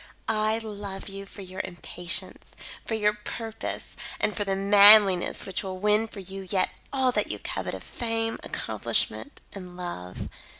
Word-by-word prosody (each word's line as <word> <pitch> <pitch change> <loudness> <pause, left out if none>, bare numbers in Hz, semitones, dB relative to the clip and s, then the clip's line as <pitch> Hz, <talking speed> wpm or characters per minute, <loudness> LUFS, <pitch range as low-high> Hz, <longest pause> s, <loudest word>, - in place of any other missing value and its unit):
I 215 0 +2
love 205 -3 -6
you 195 0 -8
for 195 - -10
your 185 0 -5
impatience; 175 -1 -3 0.4
for 225 - -1
your 210 -1 +2
purpose, 220 +1 -6 0.2
and 210 - +1
for 205 - 0
the 195 -1 -1
manliness 200 -1 +7
which 190 -2 -3
will 190 -2 -5
win 210 +3 +3
for 205 -2 -9
you 195 0 -8
yet 185 -1 +1 0.2
all 265 -2 +2
that - - 0
you - - -3
covet - - -4
of - - -9
fame, 225 -1 -2
accomplishment 285 - -2
and 180 -2 -9
love. 90 - -6
200 Hz, 160 wpm, -27 LUFS, 190-220 Hz, 0.4 s, manliness